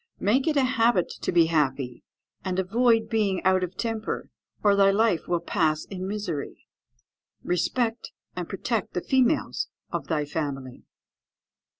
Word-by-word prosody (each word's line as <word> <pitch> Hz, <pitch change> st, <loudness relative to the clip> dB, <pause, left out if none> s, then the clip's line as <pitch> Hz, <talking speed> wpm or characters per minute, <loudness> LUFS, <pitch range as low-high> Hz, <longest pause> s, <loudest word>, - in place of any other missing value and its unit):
"Make 250 Hz, +9 st, +2 dB
it 305 Hz, -2 st, +2 dB
a 275 Hz, -, +4 dB
habit 230 Hz, -6 st, +2 dB
to -, -, -1 dB
be 170 Hz, -2 st, +5 dB
happy, 135 Hz, -6 st, 0 dB, 0.4 s
and 185 Hz, -1 st, -2 dB
avoid 225 Hz, +4 st, +3 dB
being 210 Hz, -4 st, +1 dB
out 185 Hz, 0 st, +3 dB
of 180 Hz, +1 st, -5 dB
temper, 225 Hz, -2 st, -3 dB, 0.3 s
or 205 Hz, -1 st, +5 dB
thy 195 Hz, 0 st, +5 dB
life 200 Hz, -3 st, +2 dB
will 175 Hz, -1 st, +1 dB
pass 160 Hz, -3 st, 0 dB
in 185 Hz, -1 st, -5 dB
misery. 195 Hz, -8 st, -4 dB, 0.8 s
"Respect 225 Hz, +6 st, 0 dB, 0.3 s
and -, -, -4 dB
protect -, -, -2 dB
the -, -, 0 dB
females 265 Hz, +3 st, +1 dB, 0.2 s
of -, -, -3 dB
thy 150 Hz, -3 st, 0 dB
family. 140 Hz, -4 st, -5 dB
190 Hz, 140 wpm, -26 LUFS, 165-225 Hz, 0.8 s, be